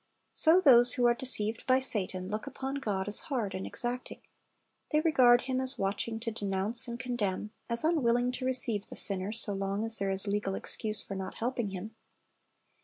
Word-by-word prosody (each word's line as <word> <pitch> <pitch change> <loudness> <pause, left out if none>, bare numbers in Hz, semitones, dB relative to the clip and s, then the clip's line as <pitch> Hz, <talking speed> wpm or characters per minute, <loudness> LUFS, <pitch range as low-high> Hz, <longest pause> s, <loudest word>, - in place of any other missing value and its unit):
So 330 +3 +6
those 245 -7 +6
who 245 -3 0
are 240 - +4
deceived 230 -3 +1
by 255 0 +4
Satan 190 -8 -1
look 215 +6 -5
upon 270 0 -5
God 200 -7 -3
as 205 - +1
hard 230 -9 -3
and 190 0 -5
exacting. 245 +1 -5 0.7
They 305 - +1
regard 255 -7 +4
Him 260 0 -3
as 260 +1 -2
watching 210 +3 -3
to 230 0 -4
denounce 205 +2 -1
and 235 0 -7
condemn, 215 -5 -4 0.2
as 235 +3 -2
unwilling 250 -7 +1
to 255 0 -6
receive 245 -5 +4
the - - -10
sinner 195 0 +1
so 225 -2 +2
long 195 +2 -3
as 225 0 +3
there 195 0 -2
is 190 +1 0
a 200 - -3
legal 200 -1 -2
excuse 215 -1 -2
for - - -8
not 190 -1 -6
helping 240 -2 -3
him. 195 +3 -8
230 Hz, 190 wpm, -29 LUFS, 200-255 Hz, 0.7 s, So